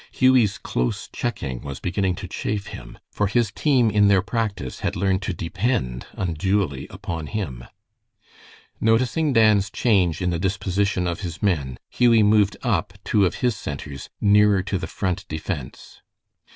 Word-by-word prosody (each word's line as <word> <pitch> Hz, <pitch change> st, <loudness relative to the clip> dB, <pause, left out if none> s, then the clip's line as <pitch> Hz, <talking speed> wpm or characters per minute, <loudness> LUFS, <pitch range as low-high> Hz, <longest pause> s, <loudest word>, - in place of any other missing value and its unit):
Hughie's 130 Hz, -6 st, +3 dB
close -, -, -2 dB
checking 70 Hz, -, -3 dB
was 70 Hz, -1 st, -7 dB
beginning 95 Hz, 0 st, -1 dB
to 95 Hz, 0 st, -7 dB
chafe 105 Hz, +2 st, -3 dB
him, -, -, -10 dB
for 105 Hz, -, 0 dB
his 110 Hz, +1 st, +1 dB
team 125 Hz, -4 st, +2 dB
in 105 Hz, 0 st, +4 dB
their 100 Hz, -2 st, +4 dB
practice 100 Hz, -, -3 dB
had -, -, -2 dB
learned 95 Hz, +1 st, +1 dB
to 105 Hz, -, -2 dB
depend 85 Hz, -, -2 dB
unduly 90 Hz, -4 st, -1 dB
upon 80 Hz, -3 st, -5 dB
him. 70 Hz, -, -4 dB, 1.1 s
Noticing 125 Hz, +7 st, +2 dB
Dan's 110 Hz, -4 st, +4 dB
change 95 Hz, -9 st, +2 dB
in 90 Hz, -1 st, 0 dB
the 85 Hz, -, -1 dB
disposition 95 Hz, 0 st, 0 dB
of 85 Hz, -1 st, -2 dB
his 85 Hz, -3 st, -6 dB
men, 70 Hz, -11 st, 0 dB
Hughie 115 Hz, -3 st, +4 dB
moved 105 Hz, -1 st, +3 dB
up -, -, 0 dB
two 100 Hz, -3 st, +3 dB
of -, -, -4 dB
his 120 Hz, -3 st, +2 dB
centers 70 Hz, -1 st, -7 dB
nearer 105 Hz, -1 st, +4 dB
to 95 Hz, 0 st, -2 dB
the -, -, -4 dB
Front 95 Hz, -3 st, -3 dB
defense. 75 Hz, -3 st, -6 dB
95 Hz, 150 wpm, -23 LUFS, 85-105 Hz, 1.1 s, in